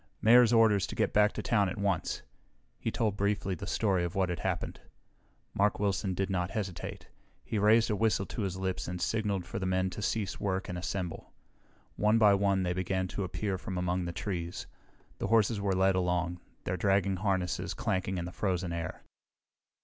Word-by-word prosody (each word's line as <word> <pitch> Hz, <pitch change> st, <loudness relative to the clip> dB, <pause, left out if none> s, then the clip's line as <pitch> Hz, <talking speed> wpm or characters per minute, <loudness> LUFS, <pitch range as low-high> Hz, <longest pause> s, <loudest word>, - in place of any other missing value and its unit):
"Mayor's 120 Hz, +2 st, +6 dB
orders 110 Hz, -4 st, +4 dB
to -, -, -6 dB
get -, -, 0 dB
back 105 Hz, 0 st, +5 dB
to -, -, -4 dB
town 105 Hz, -5 st, +2 dB
at -, -, -5 dB
once." 100 Hz, -4 st, -1 dB, 0.6 s
He -, -, -1 dB
told 110 Hz, -3 st, 0 dB
briefly 100 Hz, -1 st, 0 dB
the 85 Hz, -, -6 dB
story 95 Hz, -5 st, +1 dB
of 85 Hz, -, -3 dB
what 95 Hz, -2 st, +1 dB
had 90 Hz, -, -3 dB
happened. -, -, -3 dB, 0.7 s
Mark 105 Hz, +1 st, +2 dB
Wilson 100 Hz, -2 st, 0 dB
did 95 Hz, +1 st, 0 dB
not 90 Hz, -2 st, -1 dB
hesitate. 95 Hz, -5 st, -5 dB, 0.4 s
He 110 Hz, -, -1 dB
raised 110 Hz, +2 st, +4 dB
a -, -, +1 dB
whistle 110 Hz, -2 st, +1 dB
to 110 Hz, -, -5 dB
his 95 Hz, -2 st, -2 dB
lips 95 Hz, -1 st, -2 dB
and 90 Hz, +1 st, -4 dB
signaled 100 Hz, -2 st, -1 dB
for -, -, -5 dB
the 95 Hz, -, -2 dB
men 95 Hz, 0 st, +1 dB
to 100 Hz, -, -6 dB
cease 105 Hz, 0 st, -1 dB
work 95 Hz, -1 st, -1 dB
and 90 Hz, -, -4 dB
assemble. 90 Hz, 0 st, -4 dB, 0.7 s
One 105 Hz, +2 st, +4 dB
by 105 Hz, -2 st, +6 dB
one 100 Hz, -1 st, +2 dB
they 90 Hz, -1 st, 0 dB
began 95 Hz, +1 st, -1 dB
to 100 Hz, -, -3 dB
appear 95 Hz, +1 st, -2 dB
from 95 Hz, 0 st, -5 dB
among 90 Hz, 0 st, 0 dB
the 85 Hz, -, -3 dB
trees. 85 Hz, -1 st, -4 dB, 0.5 s
The -, -, -1 dB
horses 110 Hz, -1 st, +3 dB
were 100 Hz, -1 st, +1 dB
led 95 Hz, +1 st, +4 dB
along, 90 Hz, -1 st, 0 dB, 0.2 s
their 95 Hz, -, -2 dB
dragging 95 Hz, +1 st, +2 dB
harnesses 95 Hz, -2 st, -1 dB
clanking 95 Hz, -1 st, -1 dB
in 85 Hz, -, -3 dB
the 90 Hz, -, -6 dB
frozen 90 Hz, -2 st, -1 dB
air. 85 Hz, 0 st, -5 dB
95 Hz, 195 wpm, -30 LUFS, 90-105 Hz, 0.7 s, Mayor's